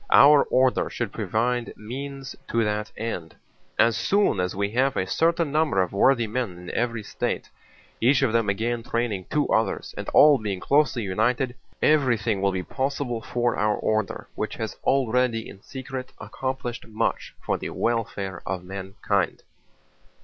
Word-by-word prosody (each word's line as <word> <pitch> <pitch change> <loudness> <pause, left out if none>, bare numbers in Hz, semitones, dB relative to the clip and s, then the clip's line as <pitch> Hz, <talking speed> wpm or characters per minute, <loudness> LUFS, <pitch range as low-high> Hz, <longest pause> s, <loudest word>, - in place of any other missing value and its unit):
Our 145 0 +7
order 130 0 +2
should 120 -5 -3
provide 115 +4 -1
means 135 +5 -6
to 115 0 +1
that 105 -1 -2
end. 105 -7 -4 0.4
"As 115 -1 +4
soon 200 - +2
as 90 0 -1
we 100 +1 -1
have 130 +3 +1
a 95 - +1
certain 165 - +1
number 150 -8 +2
of 95 0 0
worthy 120 +4 +4
men 110 -4 -3
in 90 0 -8
every 115 -2 -1
state, - - -3 0.5
each 130 +4 +4
of 120 -4 +2
them 115 -3 +2
again 115 +4 -1
training 115 -5 -2
two 150 -1 +1
others 110 - 0
and - - -5
all 145 -3 +7
being 100 -4 -3
closely 135 +1 +2
united, 120 +6 0 0.3
everything 120 -9 +3
will 100 0 +2
be 95 -1 -2
possible 130 0 -2
for 120 +1 0
our 105 0 +1
order, 110 -2 -1
which - - -3
has - - -4
already 125 -3 +2
in 100 - -12
secret 130 +1 -7
accomplished 130 -3 -4
much 110 -1 -2
for - - -2
the - - -4
welfare 100 -5 -2
of 95 -1 -4
mankind." 95 0 -2
115 Hz, 155 wpm, -25 LUFS, 100-130 Hz, 0.5 s, Our